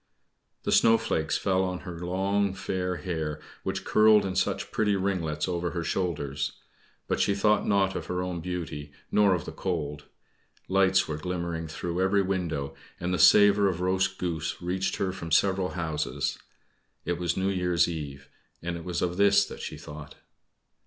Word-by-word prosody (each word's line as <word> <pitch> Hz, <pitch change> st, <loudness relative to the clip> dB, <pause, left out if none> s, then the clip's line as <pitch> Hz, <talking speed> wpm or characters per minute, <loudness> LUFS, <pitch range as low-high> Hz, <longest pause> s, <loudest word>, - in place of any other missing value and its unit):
The -, -, -1 dB
snowflakes 115 Hz, -9 st, +3 dB
fell 95 Hz, -1 st, +1 dB
on 90 Hz, -1 st, -3 dB
her 85 Hz, -2 st, -7 dB
long 95 Hz, +2 st, 0 dB
fair 90 Hz, -2 st, -2 dB
hair, 80 Hz, -5 st, -3 dB, 0.2 s
which -, -, -3 dB
curled 110 Hz, -1 st, +5 dB
in 95 Hz, -1 st, -3 dB
such 95 Hz, -, -1 dB
pretty 105 Hz, -2 st, +2 dB
ringlets 90 Hz, -6 st, -1 dB
over 90 Hz, -1 st, -1 dB
her 85 Hz, -1 st, -3 dB
shoulders; 70 Hz, -7 st, -2 dB, 0.5 s
but -, -, 0 dB
she 100 Hz, -, +2 dB
thought 105 Hz, +1 st, +2 dB
not 100 Hz, -1 st, +2 dB
of -, -, -4 dB
her 90 Hz, 0 st, -2 dB
own 90 Hz, -2 st, -4 dB
beauty, 80 Hz, -5 st, -5 dB, 0.2 s
nor 100 Hz, -3 st, +4 dB
of 85 Hz, -, -5 dB
the -, -, -6 dB
cold. 75 Hz, -5 st, -3 dB, 0.6 s
Lights 95 Hz, 0 st, +3 dB
were 75 Hz, -, -3 dB
glimmering 85 Hz, -1 st, -3 dB
through 85 Hz, +3 st, -3 dB
every 100 Hz, +1 st, +3 dB
window, 85 Hz, -7 st, -2 dB, 0.3 s
and 90 Hz, +1 st, -2 dB
the 90 Hz, -, 0 dB
savor 105 Hz, -1 st, +7 dB
of 90 Hz, -2 st, -3 dB
roast 95 Hz, +1 st, +1 dB
goose 85 Hz, -3 st, -3 dB
reached 95 Hz, +2 st, -1 dB
her 95 Hz, -1 st, -1 dB
from 90 Hz, -3 st, -7 dB
several 95 Hz, +3 st, +2 dB
houses. 80 Hz, -3 st, -2 dB, 0.7 s
It 85 Hz, -1 st, -1 dB
was 85 Hz, -1 st, -1 dB
New 95 Hz, +1 st, +1 dB
Year's 90 Hz, -3 st, +2 dB
Eve, 70 Hz, -5 st, -6 dB, 0.4 s
and 85 Hz, 0 st, -3 dB
it 85 Hz, -, -8 dB
was 90 Hz, -1 st, -2 dB
of 90 Hz, 0 st, -1 dB
this 100 Hz, 0 st, +5 dB
that -, -, -9 dB
she -, -, -6 dB
thought. 75 Hz, +1 st, -10 dB
90 Hz, 170 wpm, -27 LUFS, 85-95 Hz, 0.7 s, savor